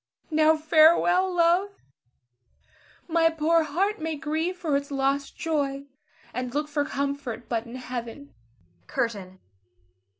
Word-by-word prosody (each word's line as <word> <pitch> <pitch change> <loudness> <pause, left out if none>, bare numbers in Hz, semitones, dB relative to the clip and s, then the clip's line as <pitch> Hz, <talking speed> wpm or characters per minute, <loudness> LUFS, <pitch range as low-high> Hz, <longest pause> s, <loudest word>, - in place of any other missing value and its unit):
Now 315 0 +4
farewell, 335 +4 +4
love; 350 +3 +3 1.4
my 330 -1 +3
poor 325 +1 +2
heart 355 +6 -1
may 320 0 -2
grieve 320 +4 -2
for 315 -5 -1
its 280 0 -2
lost 275 0 -1
joy, 280 -4 -2 0.5
and 250 +1 -4
look 300 +1 0
for 290 -1 -1
comfort 280 -5 -4
but 230 0 -2
in 235 - -9
Heaven. 250 +2 -7 0.5
CURTAIN. 195 -5 -3
300 Hz, 120 wpm, -26 LUFS, 275-330 Hz, 1.4 s, Now